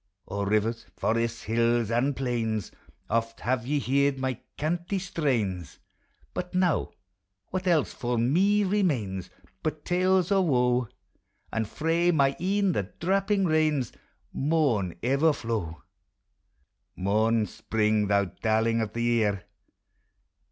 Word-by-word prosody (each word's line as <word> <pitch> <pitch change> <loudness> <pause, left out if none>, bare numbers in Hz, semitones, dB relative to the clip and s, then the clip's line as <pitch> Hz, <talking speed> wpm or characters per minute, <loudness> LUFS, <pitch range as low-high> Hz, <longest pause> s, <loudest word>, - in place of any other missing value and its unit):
O 100 +1 -3
rivers, 110 +3 0
forests, 115 +1 0
hills 115 0 +1
and 130 +4 +1
plains! 115 -6 -2 0.4
Oft 115 +1 -1
have 125 -1 -1
ye 145 +1 +1
heard 140 +1 +1
my 130 -2 -2 0.2
canty 175 +5 -1
strains: 120 - -2 0.6
But 180 - -5
now, 180 -3 +2 0.6
what 185 0 -3
else 165 -5 +2
for 120 -1 -2
me 190 - +3
remains 140 - 0 0.3
But 155 -1 -3
tales 185 +1 +2
of 195 -2 +4
wo? 125 -4 +2 0.7
And 110 -1 -1
frae 165 +5 +1
my 140 -5 +4
ecu 195 +1 +1
the 100 - -2
drappiug 195 +2 +1
rains 155 -6 +1 0.4
Maun 135 - +1
ever 140 +6 +3
flow. 100 - -4 1.1
Mourn, 110 +4 +2
Spring, 105 -1 0
thou 100 0 +3
darling 110 +5 0
of 110 -1 -3
the 115 - -2
year! 110 -5 +1
125 Hz, 120 wpm, -27 LUFS, 110-165 Hz, 1.1 s, of